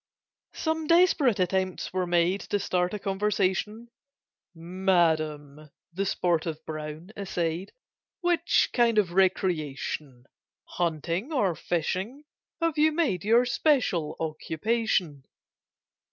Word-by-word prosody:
Some 320 -1 -2
desperate 330 - +4
attempts 185 0 -1
were 185 -1 -1
made 175 +3 +2
To 205 - +1
start 180 -2 0
a - - -2
conversation; 210 +2 -1 0.7
"Madam," 160 -4 0 0.2
the 195 +3 -1
sportive 165 -3 -1
Brown 155 +4 -7
essayed, 180 -2 -3 0.5
"Which 345 -1 +2
kind 235 -2 +3
of 195 -5 +3
recreation, 155 -8 -1 0.4
Hunting 170 - -2
or 210 - +1
fishing, 185 - -3 0.4
have 330 -3 0
you 310 +1 +5
made 300 - 0
Your 230 +4 +4
special 245 - +1
occupation?" 160 - -1
185 Hz, 100 wpm, -27 LUFS, 165-230 Hz, 0.7 s, you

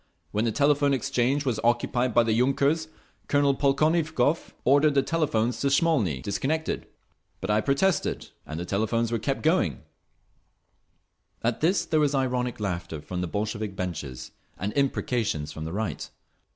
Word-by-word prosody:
When 105 +2 0
the 115 - +1
Telephone 140 +2 +3
Exchange 130 +3 0
was 120 -5 0
occupied 120 +1 +1
by 120 +1 +4
the 115 -1 +1
yunkers 140 +6 +2 0.4
Colonel 145 -1 +3
Polkovnikov 155 +1 +1
ordered 145 +2 +4
the 135 - +4
telephones 120 -8 0
to 140 - +1
Smolny 135 - +2
disconnected, 155 +10 -2 0.5
but 95 - -2
I 105 +1 +3
protested, 145 - 0
and 80 +1 -6
the 90 - -4
telephones 110 +4 0
were 115 - 0
kept 135 +4 -2
going…." 155 - +1 1.6
At 115 0 0
this 175 +5 +2
there 155 - +1
was 145 -1 +2
ironic 125 -3 -1
laughter 85 -6 -3
from 90 +4 -5
the 90 - -2
Bolshevik 105 +2 -3
benches, 75 -9 -5 0.3
and 100 +3 -3
imprecations 115 - 0
from 80 - -6
the 80 - -5
right. 100 -4 -3
125 Hz, 150 wpm, -26 LUFS, 105-145 Hz, 1.6 s, by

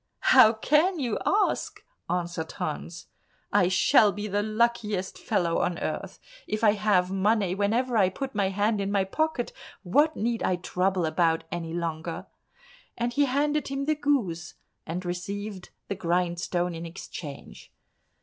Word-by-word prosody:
"How 255 -4 +9
can 305 - +2
you 245 -7 -1
ask?" 415 +1 +1 0.3
answered 170 -2 -2
Hans. 160 +2 -5 0.5
"I 200 -3 +4
shall 190 +3 +5
be 205 +1 -5
the 205 0 0
luckiest 215 -3 0
fellow 170 -2 0
on 175 - 0
earth; - - -4 0.3
if 215 +1 -3
I 215 - +7
have 200 -3 +2
money 195 -1 +2
whenever 230 +6 0
I 195 -4 +4
put 265 +8 -5
my 200 -3 +1
hand 205 +2 0
in 195 0 -2
my 200 -1 +2
pocket, 295 +5 -1 0.3
what 290 - +3
need 230 +1 -1
I 185 - +1
trouble 180 0 0
about 165 0 +1
any 165 -1 -4
longer?" 165 -1 -4 0.7
and 240 0 -1
he 285 +2 +3
handed 295 +3 0
him 275 0 -3
the 310 - +2
goose 245 - -1 0.3
and 175 +3 -4
received 190 +2 -5 0.2
the - - -2
grindstone 175 -1 -1
in 165 0 -6
exchange. 165 -4 -9
200 Hz, 150 wpm, -27 LUFS, 175-235 Hz, 0.7 s, How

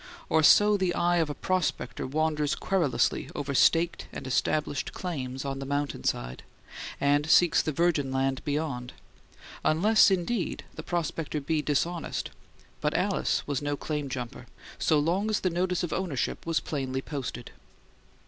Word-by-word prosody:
Or 160 - +4
so 205 +6 +6
the 185 -2 0
eye 175 0 +2
of 160 -3 +1
a 145 - -4
prospector 180 -11 -1
wanders 150 +1 0
querulously 155 -11 0
over 140 -1 -3
staked 165 +6 +3
and 135 - -7
established 145 +2 -1
claims 135 -7 -4
on 135 0 -3
the 135 - -5
mountainside, 140 - -2 0.6
and 145 +2 +2
seeks 175 0 +5
the 155 - -2
virgin 155 -3 +1
land 135 0 0
beyond; 140 -4 -3 0.7
unless, 205 +8 +5
indeed, 190 +2 -1
the - - -7
prospector 165 -3 -2
be 150 +2 0
dishonest. 165 +4 -1 0.5
But - - -1
Alice - - 0
was 145 -2 -2
no 145 0 -2
claim 150 -2 -3
jumper 125 -2 -6 0.3
so 155 - +3
long 175 +8 +1
as 215 - 0
the 185 - +1
notice 180 +1 0
of 175 - -2
ownership 170 -4 -2
was 165 -1 +2
plainly 135 -3 -3
posted. 135 -4 -5
150 Hz, 150 wpm, -28 LUFS, 135-175 Hz, 0.7 s, so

